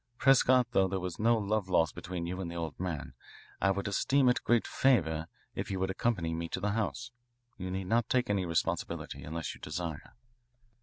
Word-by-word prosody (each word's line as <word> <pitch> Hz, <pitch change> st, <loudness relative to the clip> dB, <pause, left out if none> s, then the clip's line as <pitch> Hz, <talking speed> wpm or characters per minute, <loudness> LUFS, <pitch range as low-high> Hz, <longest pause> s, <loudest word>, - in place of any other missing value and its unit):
Prescott, 130 Hz, -1 st, +5 dB
though 95 Hz, 0 st, +4 dB
there 95 Hz, +1 st, -2 dB
was 90 Hz, -1 st, -5 dB
no 115 Hz, +2 st, +4 dB
love 105 Hz, -2 st, -1 dB
lost 80 Hz, -5 st, +3 dB
between 85 Hz, -1 st, -5 dB
you 90 Hz, +2 st, -4 dB
and 85 Hz, -, -4 dB
the 85 Hz, -, -7 dB
old 80 Hz, -4 st, -4 dB
man, 85 Hz, -8 st, -4 dB, 0.5 s
I 100 Hz, -, +4 dB
would 100 Hz, +1 st, 0 dB
esteem 130 Hz, +6 st, +3 dB
it 125 Hz, -, +3 dB
a -, -, -28 dB
great 120 Hz, -1 st, +2 dB
favour 80 Hz, -, +2 dB, 0.3 s
if -, -, -4 dB
you 95 Hz, -, -2 dB
would 95 Hz, 0 st, 0 dB
accompany 95 Hz, -6 st, 0 dB
me 85 Hz, 0 st, -3 dB
to -, -, -3 dB
the 100 Hz, +2 st, 0 dB
house. 115 Hz, +3 st, -2 dB, 0.5 s
You 90 Hz, 0 st, -4 dB
need 95 Hz, +1 st, -3 dB
not 115 Hz, +3 st, +1 dB
take 125 Hz, -1 st, +2 dB
any 100 Hz, -3 st, 0 dB
responsibility 85 Hz, -1 st, -2 dB
unless 80 Hz, -2 st, -4 dB
you -, -, -15 dB
desire." 80 Hz, 0 st, -5 dB
95 Hz, 205 wpm, -31 LUFS, 85-110 Hz, 0.5 s, Prescott